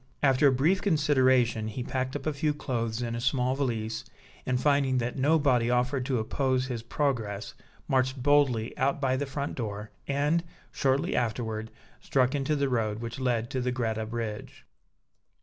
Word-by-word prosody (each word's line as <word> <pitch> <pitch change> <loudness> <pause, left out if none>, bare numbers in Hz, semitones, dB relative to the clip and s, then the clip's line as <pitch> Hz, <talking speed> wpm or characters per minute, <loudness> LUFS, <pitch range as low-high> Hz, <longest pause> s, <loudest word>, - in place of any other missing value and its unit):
After 135 +1 +5
a - - +5
brief 155 +9 +2
consideration, 130 - +3
he 115 +3 -4
packed 130 +1 -2
up 145 - -4
a 155 - 0
few 150 +1 0
clothes 115 -4 -2
in 115 -1 -3
a 115 - -3
small 125 0 +1
valise, 115 -5 -2 0.4
and, 125 -1 +1
finding 140 -2 +2
that 120 0 -1
nobody 140 -4 +3
offered 125 +2 +1
to 130 -3 +1
oppose 130 +3 0
his 125 -3 -4
progress, 115 -5 -2 0.3
marched 130 -1 +1
boldly 135 -6 +3
out 140 +2 +1
by 130 -2 +1
the 140 +2 -2
front 140 +1 -3
door, 105 -3 -5 0.2
and, 145 +4 +1 0.3
shortly 140 +7 +1
afterward, 110 -2 -2 0.3
struck 130 -1 +1
into 145 +1 0
the 140 -1 +1
road 110 -5 0
which 115 +2 -6
led 120 -3 0
to 130 - -1
the 125 0 0
Greta 110 -3 -2
Bridge. 110 -2 -5
130 Hz, 165 wpm, -28 LUFS, 115-140 Hz, 0.4 s, After